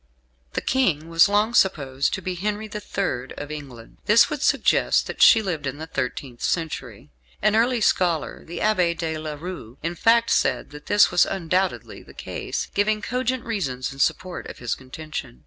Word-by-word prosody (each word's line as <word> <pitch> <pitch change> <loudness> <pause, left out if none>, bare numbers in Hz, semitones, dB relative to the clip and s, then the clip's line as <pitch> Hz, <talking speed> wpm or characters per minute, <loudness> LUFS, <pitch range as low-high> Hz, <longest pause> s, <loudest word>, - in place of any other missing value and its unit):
The - - -1
King 170 - +1
was 165 +3 +5
long 210 +3 +2
supposed 140 - +2
to 190 - -8
be 185 - -2
Henry 210 +4 -3
the 210 0 -6
Third 135 -11 -3
of 145 +1 -6
England, 135 -7 -9
and - - -32
this 215 +7 +6
would 300 -2 -3
suggest - - +3
that - - -6
she 225 -2 +7
lived 160 -7 -3
in 135 +2 -4
the 160 - -6
thirteenth 130 -4 -4
century. 130 - -3 0.3
An 215 +1 +2
early 235 +1 +2
scholar, 175 -7 +1
the 170 +1 -8
Abbé 180 -6 +1
de 160 -1 -3
La 155 -1 -5
Rue, 145 -7 -8
in 165 +2 -2
fact, 230 +6 +3
said - - +1
that 150 0 -12
this 205 0 +5
was 175 - +4
"undoubtedly" 185 +1 -2
the - - -16
case, - - -4
giving 215 +1 +1
cogent 255 0 -2
reasons 135 - -3
in 135 - -13
support 180 +5 -1
of - - -9
his 120 -2 -2
contention. 135 -1 -7
170 Hz, 185 wpm, -23 LUFS, 145-210 Hz, 0.3 s, she